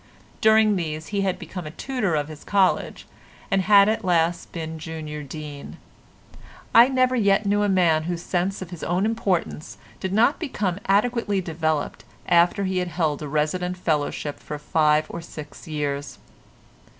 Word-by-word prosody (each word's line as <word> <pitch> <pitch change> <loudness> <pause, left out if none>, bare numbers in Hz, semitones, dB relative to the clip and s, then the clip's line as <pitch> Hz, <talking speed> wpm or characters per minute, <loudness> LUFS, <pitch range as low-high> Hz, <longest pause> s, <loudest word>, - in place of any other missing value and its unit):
During 220 -1 +5
these 155 -2 -4
he 200 -1 -1
had 190 -2 0
become 180 -4 -7
a 150 - -11
tutor 245 -11 -1
of 145 -1 -1
his 155 -1 -10
college, 195 -2 +1 0.5
and 195 - +3
had 200 +1 +6
at 220 +1 0
last 170 -2 +1
been 160 -1 -5
Junior 155 -1 -6
Dean. 145 0 -8 1.0
I 235 +2 +8
never 255 -1 +2
yet 200 -3 +3
knew 205 +1 +2
a 205 - +2
man 170 -5 +3
whose 175 0 -3
sense 185 +2 -1
of 180 - -12
his 175 - -8
own 180 +4 0
importance 200 -8 -2 0.2
did 190 - -3
not 230 +8 +3
become 205 - -2
adequately 205 0 +2
developed 160 -4 -2 0.2
after 175 +3 +4
he 190 -1 0
had 180 - -1
held 155 -3 -1
a 150 - -4
resident 165 +5 -1
fellowship 150 -3 -2
for 150 - -6
five 150 +1 +2
or 170 - -7
six 150 -2 -10
years. 145 -2 -3
175 Hz, 160 wpm, -24 LUFS, 155-200 Hz, 1.0 s, I